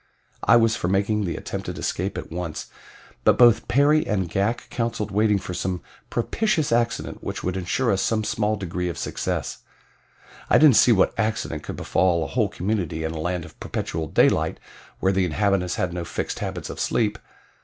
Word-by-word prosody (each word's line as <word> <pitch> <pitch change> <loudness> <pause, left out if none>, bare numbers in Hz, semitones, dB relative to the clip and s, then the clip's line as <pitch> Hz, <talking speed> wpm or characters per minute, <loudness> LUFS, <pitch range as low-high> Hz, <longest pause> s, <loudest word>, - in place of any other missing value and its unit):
I 115 - +6
was 115 -1 +4
for 90 - -2
making 100 +2 +1
the 85 - -2
attempted - - -5
escape 95 +3 -2
at - - -6
once, 85 -2 -5 0.5
but - - +4
both 120 -2 +5
Perry 145 +5 +3
and 95 -4 0
Ghak 100 +7 -1
counseled 115 -3 -2
waiting 105 0 +3
for 95 -1 -6
some 90 -2 -3 0.3
propitious 155 - 0
accident 115 -1 -1
which - - -5
would 90 0 -1
insure 105 +7 0
us 95 -1 +1
some 110 +1 +1
small 110 -1 0
degree 90 -2 -3
of 85 - -5
success. - - -3 0.9
I - - +6
didn't 150 -7 +7
see 125 - +6
what 95 -4 +4
accident 110 -8 -1
could - - -6
befall 85 -3 +1
a - - -3
whole - - +1
community 90 -5 -2
in 80 - -2
a 80 - -4
land 90 0 -2
of 80 - -15
perpetual 80 -1 -3
daylight - - +2 0.4
where 95 - +2
the 95 0 +2
inhabitants 90 +1 +1
had 90 -1 -1
no 90 -1 -3
fixed - - -4
habits - - -4
of - - -8
sleep. 110 -2 0
100 Hz, 185 wpm, -24 LUFS, 90-115 Hz, 0.9 s, didn't